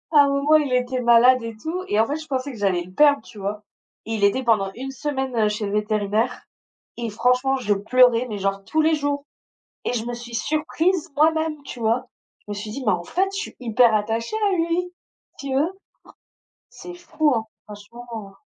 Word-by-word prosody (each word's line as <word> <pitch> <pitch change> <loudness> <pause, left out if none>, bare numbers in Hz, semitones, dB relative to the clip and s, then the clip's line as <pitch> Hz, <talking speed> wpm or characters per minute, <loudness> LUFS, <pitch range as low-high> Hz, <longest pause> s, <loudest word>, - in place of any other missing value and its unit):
À 285 -1 +8
un - - 0
moment, 280 +2 +2
il 290 -4 -1
était 250 0 0
malade 240 +1 +6
et 230 -1 -6
tout 340 +9 -4
et 210 - +1
en 225 - +5
fait 290 +4 -3
je 310 0 -10
pensais 270 0 -2
que 235 - -10
j'allais 185 -3 +1
le 180 - -14
perdre, 285 -3 +4
tu 210 - -13
vois? 205 +2 -4 0.4
Il 220 -2 -3
était 230 +6 +3
pendant 210 -5 +2
1 265 +2 -6
semaine, 265 -2 -3
heu, 215 -2 +3
chez 210 0 -3
le 200 - -3
vétérinaire 210 +2 -1 0.5
et 235 -1 -3
franchement 250 +5 +1
je 210 -5 +1
pleurais, 245 +4 +3
mais 210 - -4
genre 195 0 -2
tous 315 - -1
les 320 +1 +3
jours 285 -1 -2 0.6
et - - -1
je 235 -1 -2
me 240 - -3
suis 240 0 -9
surprise 320 - 0
moi-même, 315 -1 +2
tu 250 - -8
vois? 235 +3 0 0.3
Je - - -36
me 205 - -3
suis 210 +1 -6
dit: 275 - -5
«Mais 205 - +4
en 175 -1 -2
fait, 380 - 0
je - - -5
suis 435 - -6
hyper 235 -1 +3
attachée 225 - -1
à 375 - +1
lui». 340 +2 -1 0.5
Tu 275 -1 -5
vois? 295 +6 +2 1.0
C'est 355 - -10
fou, 315 -4 0
hein, 220 -1 -2 0.2
franchement. 215 0 -10
245 Hz, 210 wpm, -23 LUFS, 215-290 Hz, 1.0 s, À